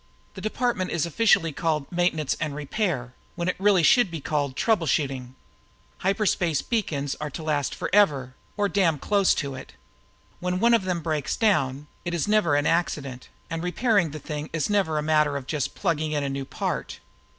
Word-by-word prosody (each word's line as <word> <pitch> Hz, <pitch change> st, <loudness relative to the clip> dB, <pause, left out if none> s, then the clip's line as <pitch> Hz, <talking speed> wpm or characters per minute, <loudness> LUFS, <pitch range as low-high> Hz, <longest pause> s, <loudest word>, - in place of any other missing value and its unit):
"This -, -, -9 dB
department 215 Hz, -4 st, -1 dB
is 170 Hz, -1 st, 0 dB
officially 170 Hz, -1 st, +3 dB
called 155 Hz, -1 st, -1 dB
Maintenance 170 Hz, -5 st, +1 dB
and 155 Hz, -3 st, -2 dB
Repair, 150 Hz, -, -2 dB, 0.2 s
when 170 Hz, 0 st, -2 dB
it 180 Hz, -, 0 dB
really 195 Hz, -3 st, +4 dB
should 245 Hz, +2 st, +5 dB
be 165 Hz, -1 st, -5 dB
called 145 Hz, -2 st, -2 dB
trouble 200 Hz, -, +1 dB
shooting. 130 Hz, -3 st, -1 dB, 0.6 s
Hyperspace 185 Hz, -6 st, +1 dB
beacons 150 Hz, -, -1 dB
are 150 Hz, -, -2 dB
made 140 Hz, -, -9 dB
to 160 Hz, -, -5 dB
last 145 Hz, -3 st, -1 dB
forever 145 Hz, -11 st, +2 dB, 0.2 s
or 205 Hz, -1 st, +2 dB
damn 185 Hz, -6 st, +2 dB
close 200 Hz, +5 st, +2 dB
to 140 Hz, -2 st, -3 dB
it. 130 Hz, 0 st, -10 dB, 0.7 s
When 180 Hz, 0 st, -1 dB
one 235 Hz, +3 st, +4 dB
of 225 Hz, -5 st, +3 dB
them 180 Hz, -2 st, -1 dB
breaks 150 Hz, -3 st, -1 dB
down, 150 Hz, -, +1 dB, 0.2 s
it 175 Hz, -1 st, -2 dB
is 170 Hz, -, -1 dB
never 210 Hz, -8 st, +3 dB
an 145 Hz, 0 st, +1 dB
accident, 140 Hz, -7 st, -1 dB, 0.2 s
and 165 Hz, 0 st, -4 dB
repairing 195 Hz, 0 st, +2 dB
the 150 Hz, -, -7 dB
thing 150 Hz, 0 st, -5 dB
is 165 Hz, +5 st, -1 dB
never 190 Hz, -7 st, +1 dB
a 150 Hz, -, 0 dB
matter 150 Hz, -2 st, +2 dB
of 135 Hz, -, -7 dB
just 145 Hz, -1 st, -2 dB
plugging 155 Hz, -4 st, -1 dB
in 145 Hz, -1 st, 0 dB
a 140 Hz, -, -1 dB
new 135 Hz, 0 st, -4 dB
part." -, -, -4 dB
160 Hz, 185 wpm, -25 LUFS, 145-190 Hz, 0.7 s, should